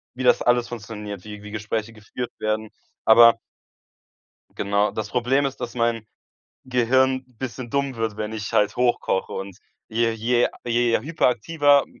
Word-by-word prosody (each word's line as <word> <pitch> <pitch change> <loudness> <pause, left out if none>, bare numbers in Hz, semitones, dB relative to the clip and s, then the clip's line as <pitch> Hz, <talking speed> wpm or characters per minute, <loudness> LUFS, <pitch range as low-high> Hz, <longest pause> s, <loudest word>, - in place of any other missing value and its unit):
wie 130 - -4
das 125 - +4
alles 120 -1 +2
funktioniert, 105 -4 -7
wie 105 -1 -9
wie 105 - -9
Gespräche 110 +1 -3
geführt 115 +3 -7
werden. 110 0 -2 0.4
Aber 115 +1 +7 1.1
genau, 100 +1 0
das 110 - -4
Problem 130 +3 +1
ist, 135 - -3
dass 120 -2 -5
mein 115 -2 0 0.6
Gehirn 130 +1 +2
bisschen 125 0 -7
dumm 140 0 -1
wird, 115 -2 -2
wenn 105 0 -4
ich 110 -2 -5
halt 105 0 +2
hochkoche. 120 -6 0
Und 95 -1 -6 0.3
je 115 +1 +1
je 120 +2 +1 0.2
je 120 0 +2
hyperaktiver 145 0 +2
115 Hz, 145 wpm, -23 LUFS, 110-125 Hz, 1.1 s, Aber